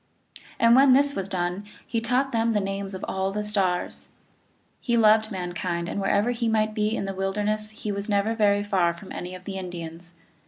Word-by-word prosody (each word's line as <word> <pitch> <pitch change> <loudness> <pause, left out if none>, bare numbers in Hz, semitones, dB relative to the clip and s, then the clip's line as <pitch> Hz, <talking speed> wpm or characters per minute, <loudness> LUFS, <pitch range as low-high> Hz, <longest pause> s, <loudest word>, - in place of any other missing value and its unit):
And 230 +1 +6
when 265 0 +7
this 280 +2 +4
was 195 0 -3
done 180 +1 -2 0.2
he 230 -1 -2
taught 250 +4 +1
them 230 0 +1
the 210 - +2
names 195 0 -3
of 185 - -5
all 190 0 -1
the 210 +1 -2
stars. 195 -4 -1 0.7
He 235 -2 0
loved 220 -1 +5
mankind, 175 -3 -3
and 200 - -3
wherever 200 +4 +2
he 235 -1 -1
might 215 -1 +1
be 215 +1 0
in 200 - -2
the 195 - -3
wilderness 210 +3 -1
he 215 -1 -5
was 200 +1 -4
never 205 +2 +2
very 205 -2 +2
far 185 -4 +1
from 195 +2 -12
any 180 +1 -6
of 180 - -11
the 195 -1 -4
Indians. 175 -1 -8
205 Hz, 200 wpm, -25 LUFS, 185-220 Hz, 0.7 s, when